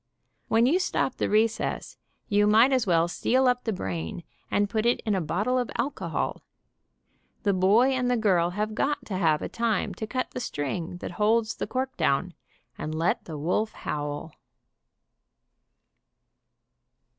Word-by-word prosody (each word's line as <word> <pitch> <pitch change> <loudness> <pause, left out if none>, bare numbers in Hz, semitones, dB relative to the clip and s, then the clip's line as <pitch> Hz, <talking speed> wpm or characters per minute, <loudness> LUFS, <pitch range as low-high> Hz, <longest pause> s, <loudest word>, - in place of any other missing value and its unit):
When 225 +1 +4
you 320 +9 +3
stop 310 -7 -1
the - - 0
recess 220 +2 0 0.3
you 205 0 +3
might 225 +6 +5
as 250 -5 +1
well 170 -1 +3
seal 255 +8 +2
up 250 0 +1
the 225 - 0
brain, 95 - -4 0.3
and 205 0 +2
put 215 +1 -1
it 240 +1 +2
in 215 - -1
a 190 - +1
bottle 210 +11 0
of 245 - -2
alcohol. 285 - -2 1.0
The 200 - +2
boy 200 +8 +4
and 255 -1 0
the 245 - +2
girl 185 -6 +3
have 210 +4 -2
got 285 +6 -1
to 195 - -4
have 160 -4 +2
a - - -2
time 230 -4 -1
to 220 - -5
cut 255 +3 -2
the - - -5
string 165 - -3
that - - -5
holds 225 +2 +3
the - - -4
cork 260 +1 -2
down, 170 +6 +1 0.5
and 155 +1 -4
let 165 +2 0
the 160 -3 -6
wolf 180 +8 0
howl. 145 +1 -4
210 Hz, 160 wpm, -27 LUFS, 175-240 Hz, 1.0 s, might